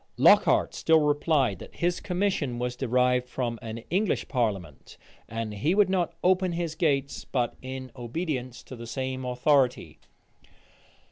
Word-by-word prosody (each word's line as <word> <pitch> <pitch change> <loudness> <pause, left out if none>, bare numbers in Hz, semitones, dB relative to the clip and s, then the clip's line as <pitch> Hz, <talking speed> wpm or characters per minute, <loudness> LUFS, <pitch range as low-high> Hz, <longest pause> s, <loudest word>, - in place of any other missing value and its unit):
Lockhart - - +5
still 160 -1 +3
replied, 145 - +1
that - - -12
his 175 0 0
commission 180 -9 -1
was 125 0 -2
derived 125 0 +1
from 120 -3 -3
an 115 0 -7
English 195 +3 0
parliament, 100 - -3 0.3
and 115 -1 -4
he 150 - 0
would 200 -2 +4
not 175 -3 0
open 185 -1 +3
his 170 -2 -2
gates 140 -6 0
but 120 -2 -1
in 130 0 -7
obedience 130 0 -4
to 130 - -10
the 115 -1 -9
same 130 +1 -3
authority. 125 +1 +1
130 Hz, 140 wpm, -27 LUFS, 120-165 Hz, 0.3 s, Lockhart